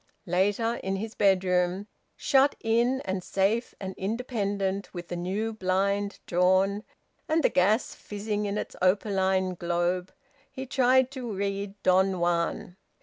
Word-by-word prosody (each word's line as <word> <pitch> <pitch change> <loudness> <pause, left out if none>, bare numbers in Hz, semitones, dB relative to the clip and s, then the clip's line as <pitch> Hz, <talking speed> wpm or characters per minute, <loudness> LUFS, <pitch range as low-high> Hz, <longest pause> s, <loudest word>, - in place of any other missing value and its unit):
Later, 205 +6 +1
in 190 0 -3
his 215 +3 -5
bedroom, 185 -1 +2 0.3
shut 275 +1 +3
in, 235 +4 +2
and 190 -1 -3
safe 205 +7 0
and 190 -1 -5
independent, 200 -3 -2
with 175 -1 -7
the 175 - -3
new 195 +6 -2
blind 200 0 0
drawn, 190 +3 +2 0.5
and 315 0 +2
the - - +5
gas 205 +6 +2
fizzing 210 0 -4
in 200 +1 -2
its - - -5
opaline 190 -1 +2
globe, 175 +1 -1 0.4
he 265 - -6
tried 260 0 +3
to 255 -4 -5
read 200 0 -3
"Don 190 0 +3
Juan." 175 +1 -1
195 Hz, 135 wpm, -27 LUFS, 185-220 Hz, 0.5 s, the